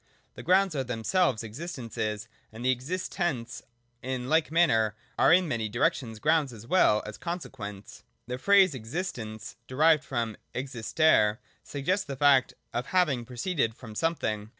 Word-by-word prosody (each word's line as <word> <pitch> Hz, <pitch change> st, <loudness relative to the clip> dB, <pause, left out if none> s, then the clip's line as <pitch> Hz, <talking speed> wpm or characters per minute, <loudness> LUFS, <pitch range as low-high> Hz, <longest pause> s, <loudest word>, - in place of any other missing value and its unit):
The -, -, -9 dB
grounds 185 Hz, -1 st, +3 dB
are 135 Hz, -, 0 dB
themselves 125 Hz, -, 0 dB
existences: 115 Hz, -, -5 dB, 0.2 s
and 115 Hz, +3 st, -8 dB
the 130 Hz, -, +4 dB
existents 135 Hz, -, -3 dB, 0.4 s
in 130 Hz, 0 st, -4 dB
like 160 Hz, +1 st, +3 dB
manner 115 Hz, -11 st, +3 dB, 0.2 s
are -, -, +5 dB
in 180 Hz, +1 st, +5 dB
many 115 Hz, -6 st, -2 dB
directions 120 Hz, -, 0 dB
grounds 150 Hz, +2 st, +2 dB
as 115 Hz, -1 st, -11 dB
well 130 Hz, -9 st, +3 dB
as 105 Hz, 0 st, -8 dB
consequents. 105 Hz, -, -7 dB, 0.2 s
The 125 Hz, 0 st, -5 dB
phrase 195 Hz, 0 st, +5 dB
'Existence' 115 Hz, -, -5 dB
(derived 155 Hz, +3 st, +4 dB
from 115 Hz, -5 st, -3 dB, 0.2 s
existere) 125 Hz, -3 st, +2 dB, 0.3 s
suggests 180 Hz, +8 st, -2 dB
the 140 Hz, -, -4 dB
fact 135 Hz, -1 st, +4 dB, 0.2 s
of 120 Hz, +1 st, -2 dB
having 150 Hz, -10 st, +1 dB
proceeded 125 Hz, -1 st, -1 dB
from 115 Hz, -4 st, -11 dB
something. 110 Hz, -7 st, -1 dB
130 Hz, 140 wpm, -28 LUFS, 110-165 Hz, 0.4 s, are